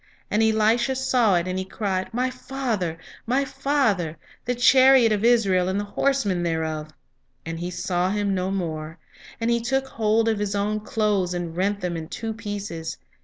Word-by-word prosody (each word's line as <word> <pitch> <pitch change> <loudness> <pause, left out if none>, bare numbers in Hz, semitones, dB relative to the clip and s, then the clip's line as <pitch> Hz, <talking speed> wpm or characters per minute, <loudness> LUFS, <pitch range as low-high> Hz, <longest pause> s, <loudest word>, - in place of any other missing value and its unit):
"And 210 - +2
Elisha 220 +4 +2
saw 250 -6 +2
it, 175 +1 0
and 185 0 -2
he - - -2
cried, 190 -1 -3
My 250 +2 0
father, 250 -10 -3 0.3
my 265 +4 +2
father, 265 - 0 0.3
the 245 0 0
chariot 255 -1 +6
of 210 0 0
Israel, 200 -7 +3
and 190 +2 0
the - - -1
horsemen 205 -4 0
thereof! 160 -2 -2 0.6
And 165 0 -5
he 175 +1 -3
saw 180 0 -1
him 205 0 0
no 185 0 -1
more; 165 -4 -4 0.4
and 230 +1 0
he 235 0 +1
took 265 +3 0
hold 225 -2 +1
of 220 -2 +1
his 205 -1 -2
own 210 +1 0
clothes, 205 -4 0
and 170 -2 -4
rent 200 +3 0
them 180 -1 -2
in 160 -1 -5
two 225 +4 -4
pieces. 205 -7 -5
205 Hz, 175 wpm, -24 LUFS, 180-235 Hz, 0.6 s, chariot